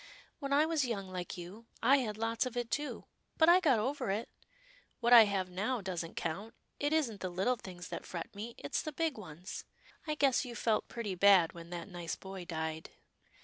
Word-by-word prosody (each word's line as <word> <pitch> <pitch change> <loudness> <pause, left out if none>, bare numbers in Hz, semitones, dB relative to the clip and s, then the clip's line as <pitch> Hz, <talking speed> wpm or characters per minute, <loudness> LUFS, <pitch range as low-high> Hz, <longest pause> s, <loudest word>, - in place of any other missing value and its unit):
" - - -30
When 275 -2 -4
I 290 +2 +5
was 320 -3 +1
young 200 -6 -3
like 180 -1 -5
you, 190 +7 -9 0.2
I 270 +4 +7
had 215 -6 -2
lots 225 +2 0
of 250 -1 -6
it, 240 -1 -2
too, 295 -1 -2 0.3
but 320 - +5
I 350 +2 +8
got 295 -9 +4
over 255 +2 -1
it. 210 +4 -1 0.7
What 240 0 +4
I 230 -2 +11
have 190 -3 -1
now 215 +7 -1
doesn't 180 -4 -4
count. 200 +8 -4 0.2
It 290 +1 +1
isn't 270 -10 +1
the 185 - -2
little 190 +8 +1
things 180 -5 -9
that - - -6
fret 170 -2 -6
me, 225 +4 -7
it's 140 - -2
the 310 - -4
big 325 -1 0
ones 180 -4 -8 0.2
— - - -26
I 305 - 0
guess 275 -3 +3
you 245 -3 -7
felt 220 -1 +1
pretty 225 -5 -4
bad 185 -2 +6
when 170 0 -10
that 175 0 -5
nice 175 -4 -4
boy 190 -2 -8
died." 160 -1 -4
215 Hz, 215 wpm, -33 LUFS, 180-255 Hz, 0.7 s, I